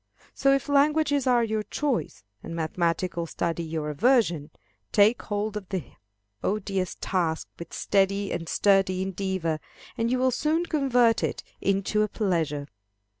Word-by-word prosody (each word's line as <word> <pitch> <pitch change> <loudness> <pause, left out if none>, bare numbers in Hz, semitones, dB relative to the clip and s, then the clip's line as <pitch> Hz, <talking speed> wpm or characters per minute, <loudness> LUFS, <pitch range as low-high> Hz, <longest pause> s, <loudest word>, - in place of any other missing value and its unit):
So, 275 - +3
if 275 +1 +1
languages 285 -1 +3
are 245 -2 +4
your 220 -1 -1
choice, 270 - -2 0.2
and 165 - -7
mathematical 170 +1 -1
study 170 +1 -2
your 160 -2 -3
aversion, 175 - +2 0.4
take 210 +3 +4
hold 210 0 -3
of 205 -3 -6
the 185 -10 -4 0.5
odious 195 -3 -1
task 170 -4 -1
with 170 - -8
steady 195 0 +1
and 165 -1 -4
sturdy 195 -2 +3
endeavor, 190 -4 -2 0.4
and 230 0 0
you 255 - +2
will 260 0 +2
soon 315 +6 +1
convert 250 -8 +2
it - - -2 0.2
into 195 +2 +1
a 215 - +2
pleasure. 165 -9 -1
200 Hz, 140 wpm, -26 LUFS, 170-240 Hz, 0.5 s, are